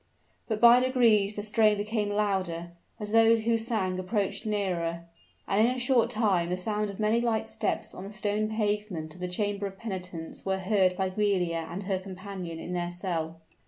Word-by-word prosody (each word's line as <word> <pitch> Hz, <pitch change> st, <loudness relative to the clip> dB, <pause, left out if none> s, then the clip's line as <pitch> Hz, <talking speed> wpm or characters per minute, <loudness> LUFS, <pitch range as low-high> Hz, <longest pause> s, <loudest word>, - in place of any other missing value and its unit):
But 220 Hz, -2 st, -1 dB
by 240 Hz, +1 st, +8 dB
degrees 230 Hz, -6 st, +3 dB
the 205 Hz, -, -4 dB
strain 215 Hz, 0 st, +3 dB
became 210 Hz, 0 st, -1 dB
louder, 190 Hz, -5 st, -1 dB, 0.3 s
as 210 Hz, -1 st, -5 dB
those 225 Hz, 0 st, +5 dB
who 230 Hz, +1 st, +2 dB
sang 220 Hz, -5 st, 0 dB
approached 200 Hz, +3 st, -1 dB
nearer; 170 Hz, -5 st, -1 dB, 0.4 s
and 200 Hz, +2 st, +3 dB
in 250 Hz, -, 0 dB
a -, -, -5 dB
short 250 Hz, -1 st, +2 dB
time 195 Hz, -6 st, +1 dB
the 180 Hz, -, -1 dB
sound 210 Hz, +2 st, -1 dB
of 200 Hz, -, -8 dB
many 215 Hz, +2 st, +2 dB
light 225 Hz, -2 st, 0 dB
steps 220 Hz, -1 st, -2 dB
on 185 Hz, -, -8 dB
the -, -, -7 dB
stone 210 Hz, 0 st, -1 dB
pavement 210 Hz, -7 st, -2 dB
of 180 Hz, -, -14 dB
the 180 Hz, -, -1 dB
chamber 200 Hz, +2 st, -2 dB
of 195 Hz, 0 st, -10 dB
penitence 180 Hz, -6 st, -6 dB
were 190 Hz, 0 st, 0 dB
heard 190 Hz, -1 st, +2 dB
by 190 Hz, -1 st, 0 dB
Giulia 180 Hz, -5 st, 0 dB
and 180 Hz, +4 st, -5 dB
her 190 Hz, -1 st, -1 dB
companion 185 Hz, -2 st, -7 dB
in 175 Hz, +2 st, -6 dB
their 175 Hz, -1 st, -1 dB
cell. 165 Hz, -3 st, -3 dB
200 Hz, 190 wpm, -28 LUFS, 180-215 Hz, 0.4 s, by